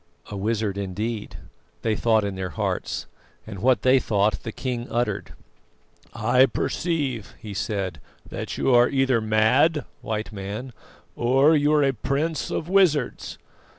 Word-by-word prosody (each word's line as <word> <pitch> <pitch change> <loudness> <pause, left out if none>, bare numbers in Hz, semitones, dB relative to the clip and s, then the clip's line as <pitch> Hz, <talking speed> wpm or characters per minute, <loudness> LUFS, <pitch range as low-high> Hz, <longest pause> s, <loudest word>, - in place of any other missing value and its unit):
"A - - -4
wizard 105 0 -1
indeed," 105 +3 -4 0.5
they 110 -1 +1
thought 110 0 +2
in 100 -1 -2
their 95 -1 -4
hearts, - - -3 0.4
and 100 -3 -8
what 130 +4 +2
they 130 +1 +5
thought 105 -3 +1
the 115 - -5
king 120 0 -4
uttered. 120 +1 -2 0.8
"I 130 +1 +4
perceive," 140 - -2
he 105 -2 -8
said, 95 -7 -3 0.3
"that - - -5
you 130 - +2
are 120 0 +6
either 135 -4 +2
mad, 115 +7 +3 0.2
White 110 +1 -3
Man, 105 +5 -6 0.4
or 135 +6 +4
you 145 0 +3
are 150 -1 +4
a 135 -1 +2
prince 140 +6 -2
of 155 - -3
wizards. 175 -8 +2
120 Hz, 145 wpm, -24 LUFS, 105-135 Hz, 0.8 s, are